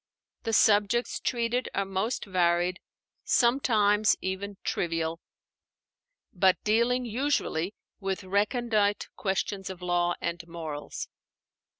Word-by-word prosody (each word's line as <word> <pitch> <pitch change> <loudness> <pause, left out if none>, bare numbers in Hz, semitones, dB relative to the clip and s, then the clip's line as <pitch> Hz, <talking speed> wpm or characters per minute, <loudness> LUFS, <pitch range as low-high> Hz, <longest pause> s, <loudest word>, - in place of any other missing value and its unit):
The 225 - -1
subjects 210 +3 +3
treated 240 +1 -1
are 200 - +1
most 195 +6 -2
varied, 180 -1 +1 0.4
sometimes 215 -4 +3
even 195 +1 -4
trivial, 165 -1 -1 1.1
but 185 0 +4
dealing 235 +4 +2
usually 225 - -1 0.2
with 195 -1 -3
recondite 205 +1 +1
questions 195 -1 -2
of 185 -1 -8
law 175 0 +1
and 170 -1 -3
morals. 160 -3 -6
200 Hz, 95 wpm, -28 LUFS, 180-225 Hz, 1.1 s, but